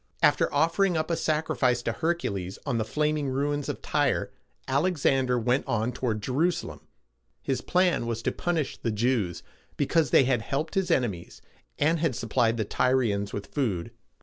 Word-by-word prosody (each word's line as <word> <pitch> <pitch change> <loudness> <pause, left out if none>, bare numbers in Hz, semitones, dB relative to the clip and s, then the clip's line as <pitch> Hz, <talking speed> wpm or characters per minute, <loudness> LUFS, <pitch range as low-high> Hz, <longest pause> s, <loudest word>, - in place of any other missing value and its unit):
After - - +4
offering 165 +4 +2
up 155 +2 -1
a - - +2
sacrifice 150 -6 0
to - - 0
Hercules 105 - -2
on 125 -5 0
the - - +1
flaming 150 +3 0
ruins 145 +2 -1
of - - -5
Tyre, - - 0 0.4
Alexander 135 -4 +2
went 125 +3 +1
on 115 -1 0
toward 115 -4 -2
Je 130 - -3
ru´sa 170 +7 +1
lem. - - -10 0.6
His 130 -2 -1
plan 180 -9 +1
was 115 -1 -3
to - - +1
punish 165 -5 -2
the 115 - -2
Jews, 110 -5 0 0.3
because 150 +1 +2
they - - +6
had 125 -3 +1
helped 145 +7 -3
his 190 -2 0
enemies, 115 - -1 0.4
and 160 +3 +2
had 155 -6 0
supplied 115 0 +1
the 110 - -1
Tyrians 110 -4 +1
with 100 - -5
food. 105 - -1
130 Hz, 170 wpm, -27 LUFS, 115-155 Hz, 0.6 s, they